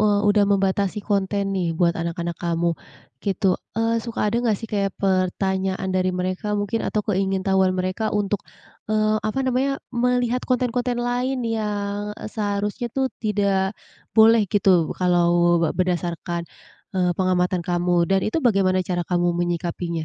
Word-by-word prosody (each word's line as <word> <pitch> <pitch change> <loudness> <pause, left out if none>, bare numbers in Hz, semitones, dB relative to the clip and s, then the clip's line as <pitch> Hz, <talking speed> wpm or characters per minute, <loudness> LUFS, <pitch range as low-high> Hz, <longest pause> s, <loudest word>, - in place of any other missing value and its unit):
eee, 210 -1 +3
udah 205 0 +4
membatasi 195 0 +1
konten 200 0 +1
nih 185 -3 0
buat 170 -1 +3
anak-anak 170 0 -3
kamu, 170 0 0 0.5
gitu. 195 0 0 0.3
Eee, 230 0 +1
suka 230 0 -5
ada 210 +2 0
enggak 225 -4 +1
sih - - -6
kayak 200 -2 -1
pertanyaan 190 0 0
dari 185 0 +1
mereka 185 +3 -2
mungkin 205 +2 -1
atau 210 -1 -1
keingintahuan 190 -1 +1
mereka 185 +4 -1
untuk, 205 -1 0 0.5
eee, 215 0 +2
apa 215 - -2
namanya, 260 +2 +1 0.2
melihat 245 0 +1
konten-konten 250 -1 0
lain 250 +2 0
yang, 210 -2 -2
e - - -9
seharusnya 205 +2 -2
tuh 265 -2 0
tidak 200 -2 0 0.4
boleh 225 +1 +7
gitu, 200 +1 +1 0.3
kalau 175 -1 +3
be 165 - +2
berdasarkan, 175 -1 -2 0.5
eee, 180 -1 +2
pengamatan 180 0 +1
kamu. 175 -1 +1
Dan 195 0 +3
itu 220 - 0
bagaimana 195 -7 +3
cara 175 -1 -2
kamu 175 0 +1
menyikapinya? 170 -1 -2
195 Hz, 145 wpm, -23 LUFS, 180-215 Hz, 0.5 s, boleh